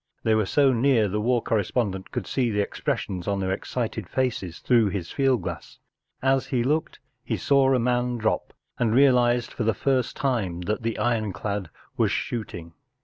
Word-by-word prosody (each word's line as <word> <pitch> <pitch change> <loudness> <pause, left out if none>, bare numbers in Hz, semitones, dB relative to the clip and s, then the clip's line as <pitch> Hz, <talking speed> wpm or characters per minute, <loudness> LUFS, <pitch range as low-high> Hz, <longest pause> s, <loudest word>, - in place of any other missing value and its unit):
They 110 - +3
were 110 -2 +2
so 140 +2 +4
near 120 -3 +3
the 105 +2 -2
war 120 +1 +1
correspondent 105 -3 -1
could - - -3
see 125 -3 0
the 105 -2 -1
expression 95 -2 -2
of 100 -1 0
their 95 -1 -1
excited 110 -1 -3
faces 115 -10 -2
through 115 -4 +3
his 90 -4 -4
field 130 -7 +1
glass. - - -6 0.5
As 135 0 +2
he. 125 -3 0
looked 150 +5 -1 0.3
he - - -2
saw 135 -1 +3
a 130 - +4
man 125 0 0
drop, 110 -1 -1 0.3
and 115 -1 +2
realized 125 -3 +4
for - - -2
the 110 -1 +1
first 130 +1 0
time 110 -11 -1
that 105 +6 -2
the 115 0 -2
ironclad 105 -4 -1 0.3
was - - +3
shooting. 90 -8 -4
115 Hz, 175 wpm, -25 LUFS, 100-125 Hz, 0.5 s, so